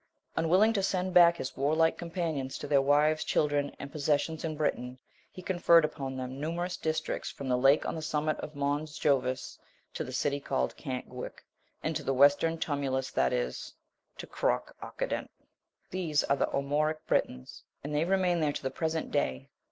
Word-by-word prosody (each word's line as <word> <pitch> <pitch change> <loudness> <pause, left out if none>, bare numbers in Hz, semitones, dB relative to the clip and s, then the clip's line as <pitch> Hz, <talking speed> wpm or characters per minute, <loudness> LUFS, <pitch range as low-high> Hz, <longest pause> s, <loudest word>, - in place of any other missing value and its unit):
Unwilling 185 +7 +4
to 200 - +1
send 185 -1 -1
back 170 -1 +7
his 130 - -5
warlike 160 +4 +2
companions 165 -6 -3
to - - -6
their 140 -1 +4
wives, 150 +3 +3
children, 145 -1 +1
and 140 - -8
possessions 155 +1 0
in 160 -2 -2
Britain, 125 -4 -2 0.3
he 185 - -11
conferred 175 -3 +5
upon 135 -3 -5
them 130 +1 -5
numerous 175 +3 -2
districts 155 0 -2
from 140 - -7
the 125 - +2
lake 135 +4 +4
on - - -2
the 160 - -5
summit 155 0 0
of 150 - -7
Mons 145 +2 -2
Jovis, 130 -2 0 0.3
to - - -3
the 130 - -7
city 140 +2 0
called 135 -1 -1
Cant 130 -4 -5
Guic, 125 0 -8 0.4
and - - -1
to - - -1
the 135 - -1
western 145 +4 +4
Tumulus, 135 -4 -2
that 65 -1 +2
is, 60 0 -3 0.4
to - - -7
Cruc - - -1
Occident.* - - -3 0.6
These 165 -5 0
are 140 - +2
the - - +1
Armoric 155 +3 -1
Britons, 65 0 -1 0.2
and 150 +1 -5
they 150 +1 +2
remain 185 -2 +2
there 150 -2 +1
to - - -5
the 130 - -2
present 160 0 -2
day. 65 - -1
150 Hz, 180 wpm, -30 LUFS, 135-165 Hz, 0.6 s, back